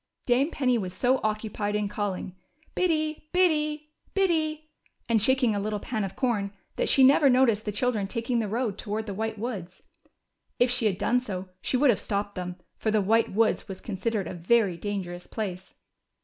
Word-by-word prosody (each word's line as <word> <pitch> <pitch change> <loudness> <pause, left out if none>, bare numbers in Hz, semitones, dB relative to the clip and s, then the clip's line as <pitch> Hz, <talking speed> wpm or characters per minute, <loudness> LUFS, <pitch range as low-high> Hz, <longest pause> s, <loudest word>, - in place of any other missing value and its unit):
Dame 260 +5 +3
Penny 250 -7 +1
was 185 -3 -5
so 255 +1 +2
occupied 215 -1 -2
in 210 -1 0
calling 200 -3 -3 0.4
Biddy, 310 -3 0
Biddy, 305 -4 +1 0.2
Biddy," 315 -5 0 0.4
and 230 -2 +3
shaking 250 -1 +3
a - - 0
little 210 +1 -2
pan 220 0 -3
of 195 - -5
corn, 215 -7 0 0.2
that - - 0
she 270 - +6
never 275 +2 +6
noticed 250 -4 +3
the 210 - -1
children 210 -1 0
taking 235 +2 -1
the 220 - -1
road 220 -1 -2
toward 215 0 -3
the 205 - -4
White 220 +2 -3
Woods. 200 -6 -6 0.7
If 245 0 +3
she 245 -3 +2
had 190 -3 0
done 245 +5 +2
so 190 -6 -6
she 255 - 0
would 275 0 +5
have 210 - -1
stopped 200 0 -2
them, 180 -1 -5 0.2
for 220 - -1
the 215 0 +3
White 225 +3 +2
Woods 220 +3 +1
was 190 -2 -7
con 215 - -5
sidered 215 0 -1
a - - -5
very 190 +2 +2
dangerous 180 -2 -5
place. 190 -4 -5
220 Hz, 190 wpm, -27 LUFS, 200-255 Hz, 0.7 s, she